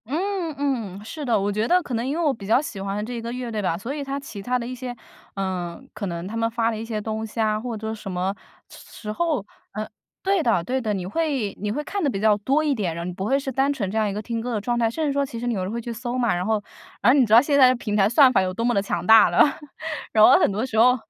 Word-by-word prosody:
嗯 350 Hz, -, -2 dB
嗯， 225 Hz, -9 st, -2 dB
是 300 Hz, +6 st, -6 dB
的， 235 Hz, -6 st, +2 dB
我 200 Hz, +1 st, 0 dB
觉 215 Hz, +2 st, 0 dB
得 360 Hz, +1 st, +4 dB
可 260 Hz, -, -6 dB
能 230 Hz, +1 st, -1 dB
因 280 Hz, +4 st, -2 dB
为 340 Hz, -, 0 dB
我 295 Hz, -4 st, +3 dB
比 200 Hz, -5 st, -9 dB
较 225 Hz, +4 st, +5 dB
喜 215 Hz, -10 st, -6 dB
欢 200 Hz, +2 st, -3 dB
这 240 Hz, 0 st, -5 dB
个 230 Hz, +1 st, -5 dB
乐 245 Hz, -1 st, -5 dB
队 215 Hz, -1 st, -2 dB
吧， 170 Hz, -4 st, 0 dB
所 230 Hz, +9 st, -5 dB
以 290 Hz, -1 st, -4 dB
它 275 Hz, 0 st, -3 dB
其 250 Hz, -7 st, -8 dB
他 250 Hz, +5 st, 0 dB
的 235 Hz, -, -4 dB
一 250 Hz, -, -5 dB
些 250 Hz, -1 st, -6 dB, 0.4 s
呃， 185 Hz, -3 st, -3 dB
可 210 Hz, -1 st, -4 dB
能 170 Hz, 0 st, -4 dB
他 215 Hz, -, -6 dB
们 230 Hz, 0 st, +1 dB
发 230 Hz, 0 st, 0 dB
的 220 Hz, -, -4 dB
一 220 Hz, -, -5 dB
些 225 Hz, -2 st, -3 dB
东 220 Hz, +1 st, -3 dB
西 220 Hz, +1 st, -8 dB
啊， 215 Hz, -1 st, +2 dB
或 230 Hz, 0 st, -4 dB
者 220 Hz, +1 st, -4 dB
什 210 Hz, -3 st, -7 dB
么 185 Hz, +2 st, -1 dB, 0.4 s
时 -, -, -13 dB, 0.2 s
时 210 Hz, -2 st, -4 dB
候。 300 Hz, -4 st, -1 dB, 0.3 s
嗯。 215 Hz, +1 st, -4 dB, 0.3 s
对 385 Hz, -3 st, +2 dB
的 220 Hz, -, +2 dB
对 260 Hz, +7 st, -1 dB
的， 220 Hz, -4 st, -1 dB
你 190 Hz, -2 st, -3 dB
会 260 Hz, -, -1 dB
你 210 Hz, +1 st, -2 dB
会 295 Hz, +7 st, -2 dB
看 395 Hz, +5 st, -3 dB
得 -, -, +2 dB
比 200 Hz, -8 st, -2 dB
较 215 Hz, -1 st, +4 dB
多 275 Hz, +9 st, +1 dB
一 295 Hz, -3 st, +1 dB
点， 190 Hz, -7 st, -2 dB
然 170 Hz, -, -4 dB
后 -, -, -4 dB
你 -, -, -3 dB
不 190 Hz, +2 st, -5 dB
会 270 Hz, +6 st, +2 dB
是 270 Hz, -1 st, -4 dB
单 270 Hz, +3 st, +1 dB
纯 205 Hz, -9 st, -3 dB
这 215 Hz, -, -3 dB
样 215 Hz, -1 st, +2 dB
一 200 Hz, -, -2 dB
个 210 Hz, -, -3 dB
听 230 Hz, +1 st, -3 dB
歌 245 Hz, +2 st, -4 dB
的 215 Hz, -, -1 dB
状 240 Hz, +3 st, -1 dB
态， 235 Hz, -1 st, +2 dB
甚 275 Hz, +8 st, -2 dB
至 -, -, +1 dB
说 280 Hz, 0 st, +1 dB
其 235 Hz, -4 st, -7 dB
实 245 Hz, -, -3 dB
你 240 Hz, -, 0 dB
可 185 Hz, -, -2 dB
能 185 Hz, -, -3 dB
会 235 Hz, +1 st, -3 dB
去 235 Hz, -, -6 dB
搜 240 Hz, +1 st, -4 dB
嘛。 245 Hz, -3 st, +1 dB
然 180 Hz, +1 st, -2 dB
后 215 Hz, -1 st, 0 dB, 0.4 s
然 235 Hz, -, +6 dB
后 280 Hz, -, +4 dB
你 255 Hz, -, +5 dB
知 215 Hz, -, 0 dB
道 230 Hz, -, +9 dB
现 285 Hz, +1 st, +1 dB
在 260 Hz, -2 st, +8 dB
的 -, -, +4 dB
平 215 Hz, -3 st, -3 dB
台 195 Hz, -2 st, +4 dB
算 255 Hz, +4 st, +6 dB
法 240 Hz, -, +3 dB
有 185 Hz, 0 st, -2 dB
多 230 Hz, -, -3 dB
么 240 Hz, -, +2 dB
地 200 Hz, -, +3 dB
强 175 Hz, -4 st, -2 dB
大 220 Hz, -1 st, +8 dB
了。 -, -, +1 dB, 0.7 s
然 215 Hz, -, +5 dB
后 -, -, +8 dB
很 -, -, +3 dB
多 210 Hz, +4 st, -2 dB
时 255 Hz, -4 st, -3 dB
候 250 Hz, +3 st, +6 dB
230 Hz, 340 characters per minute, -23 LUFS, 205-260 Hz, 0.7 s, 道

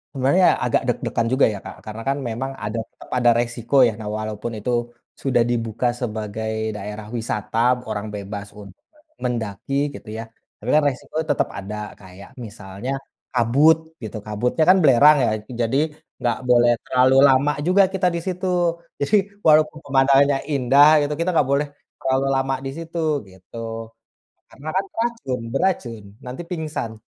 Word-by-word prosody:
Sebenarnya 140 Hz, +8 st, +4 dB, 0.2 s
agak -, -, +2 dB
deg-degan 115 Hz, -1 st, -1 dB
juga 130 Hz, -, +5 dB
ya, -, -, -5 dB
Kak, -, -, -8 dB
karena 110 Hz, +1 st, -7 dB
kan 140 Hz, -, 0 dB
memang 125 Hz, +4 st, -3 dB
ada 105 Hz, +2 st, -3 dB
tetep -, -, -17 dB
ada 120 Hz, -1 st, +4 dB
resiko 120 Hz, +2 st, -2 dB
ya. -, -, 0 dB
Nah, 110 Hz, -, -7 dB
walaupun 110 Hz, +1 st, -4 dB
itu 115 Hz, -, -4 dB, 0.5 s
sudah 130 Hz, -3 st, +1 dB
dibuka 115 Hz, 0 st, -1 dB
sebagai 110 Hz, -1 st, -3 dB, 0.3 s
daerah 105 Hz, +1 st, -7 dB
wisata, 110 Hz, -1 st, -3 dB, 0.3 s
orang 110 Hz, 0 st, -3 dB
bebas 100 Hz, 0 st, -6 dB
untuk 100 Hz, -1 st, -13 dB, 0.5 s
mendaki 115 Hz, 0 st, -3 dB, 0.2 s
gitu 105 Hz, -, -10 dB
ya, 115 Hz, -, -4 dB, 0.4 s
tapi 115 Hz, -, -5 dB
kan 155 Hz, -, +5 dB
resiko 130 Hz, +3 st, -10 dB
tetap 145 Hz, -, +1 dB
ada. 100 Hz, +2 st, -6 dB, 0.2 s
Kayak 95 Hz, +1 st, -13 dB, 0.2 s
misalnya 105 Hz, +2 st, -7 dB, 0.4 s
kabut 135 Hz, +7 st, +4 dB, 0.3 s
gitu, 110 Hz, 0 st, -5 dB
kabutnya 110 Hz, +8 st, 0 dB
kan 190 Hz, -, +7 dB
belerang 145 Hz, +3 st, +7 dB
ya, -, -, +2 dB, 0.3 s
jadi 115 Hz, +4 st, +1 dB, 0.4 s
nggak 120 Hz, -2 st, 0 dB
boleh 120 Hz, 0 st, +5 dB
terlalu 130 Hz, +1 st, +3 dB
lama 135 Hz, +2 st, +4 dB, 0.2 s
juga 195 Hz, +2 st, +5 dB
kita 185 Hz, -1 st, +1 dB
di -, -, -1 dB
situ, 185 Hz, 0 st, -3 dB, 0.6 s
jadi 170 Hz, +10 st, +2 dB, 0.3 s
walaupun 155 Hz, 0 st, +5 dB
pemandangannya 140 Hz, 0 st, +4 dB, 0.2 s
indah 140 Hz, +2 st, +5 dB
gitu, 145 Hz, +1 st, -1 dB
kita 170 Hz, -, 0 dB
enggak 145 Hz, -4 st, +2 dB
boleh 145 Hz, +1 st, +1 dB, 0.3 s
terlalu 130 Hz, +1 st, 0 dB
lama 135 Hz, 0 st, 0 dB
di -, -, -2 dB
situ, 165 Hz, +1 st, -7 dB, 0.3 s
gitu. 95 Hz, +4 st, -14 dB, 0.9 s
Karena 145 Hz, +3 st, -10 dB
kan 195 Hz, -, +2 dB
beracun 225 Hz, -, -2 dB
beracun, 125 Hz, -, -1 dB, 0.2 s
nanti 125 Hz, +6 st, -6 dB
pingsan. 155 Hz, -10 st, -4 dB
125 Hz, 155 wpm, -22 LUFS, 110-145 Hz, 0.9 s, kan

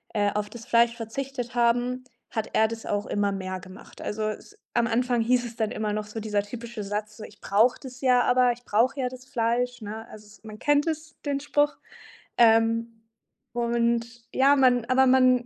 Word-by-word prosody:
äh, 205 Hz, -1 st, +2 dB
auf 210 Hz, 0 st, -2 dB
das 230 Hz, 0 st, -10 dB
Fleisch 235 Hz, 0 st, +3 dB
verzichtet 245 Hz, +2 st, -5 dB
haben, 245 Hz, +1 st, +1 dB, 0.3 s
hat 220 Hz, -2 st, -3 dB
er 220 Hz, -, +4 dB
das 225 Hz, 0 st, -7 dB
auch 205 Hz, 0 st, -1 dB
immer 205 Hz, -1 st, 0 dB
mehr 185 Hz, -1 st, -4 dB
gemacht. 185 Hz, +1 st, -13 dB
Also 215 Hz, +1 st, -3 dB
es 215 Hz, -, -9 dB, 0.2 s
am 235 Hz, -1 st, +3 dB
Anfang 240 Hz, 0 st, +1 dB
hieß 245 Hz, +1 st, +2 dB
es 230 Hz, -, -8 dB
dann 220 Hz, -2 st, -1 dB
immer 215 Hz, -1 st, -2 dB
noch 210 Hz, 0 st, -2 dB
so, 215 Hz, +1 st, -6 dB
dieser 210 Hz, -1 st, 0 dB
typische 230 Hz, +1 st, -7 dB
Satz, 210 Hz, +1 st, -4 dB
so: 215 Hz, -, -9 dB
„Ich 210 Hz, -1 st, -13 dB
brauche 220 Hz, +5 st, +3 dB
das 255 Hz, -2 st, -10 dB
ja, 250 Hz, -2 st, +4 dB
aber 250 Hz, 0 st, +4 dB
ich 245 Hz, -, -16 dB
brauche 235 Hz, +6 st, +2 dB
ja 255 Hz, -, 0 dB
das 255 Hz, 0 st, -12 dB
Fleisch“, 245 Hz, 0 st, -1 dB
ne? 220 Hz, +2 st, -7 dB
Also, 215 Hz, 0 st, -12 dB
es 210 Hz, +1 st, -19 dB
man 215 Hz, -1 st, -9 dB
kennt 290 Hz, +2 st, +2 dB
es, 315 Hz, 0 st, -4 dB
den 285 Hz, -1 st, 0 dB
Spruch. 290 Hz, +1 st, +1 dB, 0.6 s
Ähm, 225 Hz, 0 st, +3 dB, 0.5 s
und 235 Hz, 0 st, +1 dB, 0.3 s
ja, 275 Hz, +2 st, +5 dB
man 250 Hz, -3 st, +4 dB
aber 255 Hz, +2 st, +4 dB
man 255 Hz, -1 st, +4 dB
235 Hz, 200 wpm, -26 LUFS, 215-250 Hz, 0.6 s, ja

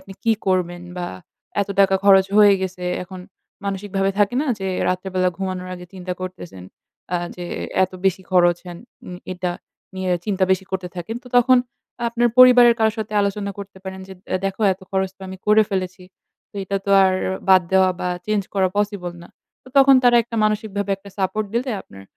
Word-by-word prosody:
আপনি 195 Hz, -, -12 dB
কি 225 Hz, -, +4 dB
করবেন? 175 Hz, -2 st, 0 dB, 0.2 s
বা 175 Hz, -, -3 dB, 0.5 s
এত 200 Hz, -, -2 dB
টাকা 195 Hz, -1 st, +4 dB
খরচ 195 Hz, -1 st, +6 dB
হয়ে 205 Hz, -1 st, +7 dB
গেছে। 185 Hz, -1 st, -5 dB, 0.2 s
এখন 185 Hz, 0 st, -9 dB, 0.4 s
মানসিকভাবে 195 Hz, 0 st, -1 dB
থাকে 205 Hz, +2 st, +2 dB
না -, -, -4 dB
যে 195 Hz, -, -4 dB, 0.2 s
রাত্রে 185 Hz, +1 st, -2 dB
বেলা 185 Hz, 0 st, +2 dB
ঘুমানোর 185 Hz, -1 st, -4 dB
আগে 180 Hz, 0 st, -10 dB
চিন্তা 185 Hz, -1 st, -5 dB
করতেছেন। 180 Hz, -, -8 dB, 0.5 s
আ -, -, +3 dB, 0.2 s
যে 175 Hz, -, -6 dB, 0.4 s
"এত 185 Hz, -, -9 dB
বেশি 190 Hz, 0 st, +1 dB
খরচ 175 Hz, -2 st, +4 dB
হ্যান?" 175 Hz, -1 st, -9 dB, 0.3 s
উম 180 Hz, -, -7 dB, 0.2 s
এটা 180 Hz, -1 st, -3 dB, 0.4 s
নিয়ে 185 Hz, -1 st, -1 dB
চিন্তা 195 Hz, -2 st, +1 dB
বেশি 190 Hz, 0 st, +2 dB
করতে 190 Hz, -1 st, -3 dB
থাকেন। 180 Hz, +6 st, -5 dB
তো 250 Hz, -, -13 dB
তখন 255 Hz, +1 st, +6 dB, 0.5 s
আপনার 240 Hz, +1 st, +1 dB
পরিবারের 245 Hz, -2 st, +8 dB
কারোর 220 Hz, -1 st, +2 dB
সাথে 215 Hz, 0 st, -4 dB
আলোচনা 200 Hz, 0 st, -1 dB
করতে 200 Hz, -1 st, -9 dB
পারেন 190 Hz, 0 st, -7 dB
যে, 190 Hz, -, -8 dB, 0.2 s
"এ -, -, +4 dB
দেখো 195 Hz, +2 st, -5 dB
এত 185 Hz, -, -10 dB
খরচ 190 Hz, -1 st, 0 dB
তো -, -, -62 dB
আমি 190 Hz, -, -7 dB
করে 215 Hz, +1 st, +6 dB
ফেলেছি। 185 Hz, -1 st, -3 dB, 0.5 s
তো -, -, -63 dB
এটা 195 Hz, +1 st, -2 dB
তো 200 Hz, -, -2 dB
আর 190 Hz, -, +3 dB, 0.4 s
বাদ 185 Hz, -1 st, +7 dB
দেওয়া 190 Hz, -1 st, +5 dB
বা 180 Hz, -, -1 dB, 0.2 s
চেঞ্জ 210 Hz, -1 st, +1 dB
করা 190 Hz, -1 st, +2 dB
পসিবল 200 Hz, -4 st, -2 dB
না।" -, -, -13 dB, 0.3 s
তো -, -, -16 dB
তখন 275 Hz, 0 st, +7 dB
তারা 240 Hz, -1 st, +6 dB
একটা 230 Hz, 0 st, -7 dB
মানসিকভাবে 205 Hz, -2 st, -1 dB
একটা 195 Hz, +1 st, -14 dB
সাপোর্ট 195 Hz, +3 st, -1 dB
দিলে 250 Hz, +2 st, -1 dB
আপনার 95 Hz, 0 st, -14 dB
190 Hz, 190 wpm, -21 LUFS, 185-210 Hz, 0.5 s, পরিবারের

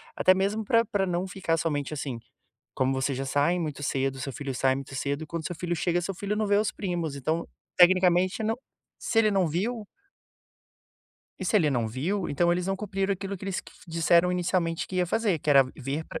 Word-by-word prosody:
até 185 Hz, -, +5 dB
mesmo 200 Hz, +3 st, 0 dB
pra 230 Hz, +2 st, +3 dB
pra 200 Hz, -4 st, 0 dB
não 180 Hz, +2 st, -1 dB
ficar 185 Hz, -4 st, -1 dB
somente, 150 Hz, -2 st, -2 dB
assim, 135 Hz, -5 st, -4 dB, 0.6 s
como 130 Hz, 0 st, +1 dB
você 135 Hz, +1 st, 0 dB
já 135 Hz, +1 st, -3 dB
sai 145 Hz, +6 st, +2 dB
muito 150 Hz, -4 st, -4 dB
cedo, 135 Hz, -1 st, -1 dB
o -, -, -8 dB
seu 135 Hz, +1 st, -4 dB
filho 135 Hz, -1 st, -5 dB
sai 130 Hz, +1 st, +2 dB
muito 135 Hz, 0 st, -7 dB
cedo 140 Hz, +3 st, -2 dB
e -, -, -13 dB
quando 165 Hz, +1 st, -4 dB
o -, -, -2 dB
seu 175 Hz, -, -5 dB
filho 175 Hz, +1 st, -2 dB
chega 175 Hz, +2 st, +1 dB
seu 190 Hz, +3 st, -4 dB
filho 200 Hz, +3 st, -3 dB
não 215 Hz, 0 st, 0 dB
vê 200 Hz, 0 st, +3 dB
os 210 Hz, +1 st, +2 dB
primos. 170 Hz, -7 st, -3 dB
Então, 160 Hz, +5 st, -1 dB, 0.3 s
tecnicamente 185 Hz, +2 st, +4 dB
não, 225 Hz, +2 st, 0 dB, 0.4 s
se 225 Hz, -, 0 dB
ele 215 Hz, -1 st, +5 dB
não 190 Hz, -3 st, +2 dB
viu 210 Hz, +7 st, -2 dB, 1.6 s
E -, -, -3 dB
se 200 Hz, +4 st, +2 dB
ele 155 Hz, -7 st, +3 dB
não 120 Hz, -4 st, 0 dB
viu, 165 Hz, -, -2 dB
então 170 Hz, +4 st, +2 dB
eles 175 Hz, +1 st, 0 dB
não 195 Hz, -, 0 dB
cumpriram 195 Hz, -1 st, -1 dB
aquilo 195 Hz, +1 st, -4 dB
que 185 Hz, -, -10 dB
eles 195 Hz, -2 st, -2 dB
q -, -, -16 dB
disseram 170 Hz, +2 st, +3 dB
inicialmente 175 Hz, -2 st, 0 dB
que 185 Hz, -, -5 dB
ia 180 Hz, -1 st, +2 dB
fazer 210 Hz, -4 st, +1 dB
que 150 Hz, -, -8 dB
era 140 Hz, -2 st, +7 dB
vir 140 Hz, +3 st, -3 dB
pra -, -, -7 dB
175 Hz, 225 wpm, -27 LUFS, 145-195 Hz, 1.6 s, era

